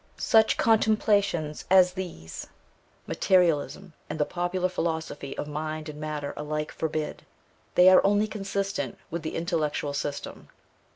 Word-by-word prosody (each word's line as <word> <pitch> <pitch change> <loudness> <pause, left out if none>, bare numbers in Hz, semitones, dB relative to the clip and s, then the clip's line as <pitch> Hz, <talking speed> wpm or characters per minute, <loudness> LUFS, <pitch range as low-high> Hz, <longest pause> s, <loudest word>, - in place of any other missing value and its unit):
Such 220 -1 +4
contemplations 205 -8 +2
as 185 -1 +6
these, 175 - -7 0.6
materialism 180 0 +1 0.2
and 150 - -4
the 150 - +3
popular 180 +2 -1
philosophy 160 -5 -3
of - - -4
mind 155 +1 -4
and 150 0 -8
matter 150 -2 -4
alike 150 0 -3
forbid; 155 -1 -3 0.5
they 180 - +7
are 185 0 +8
only 205 +1 +3
consistent 195 -1 -3
with 170 +1 -3
the 160 - -5
intellectual 155 -3 -1
system. 145 0 -5
165 Hz, 125 wpm, -27 LUFS, 150-190 Hz, 0.6 s, are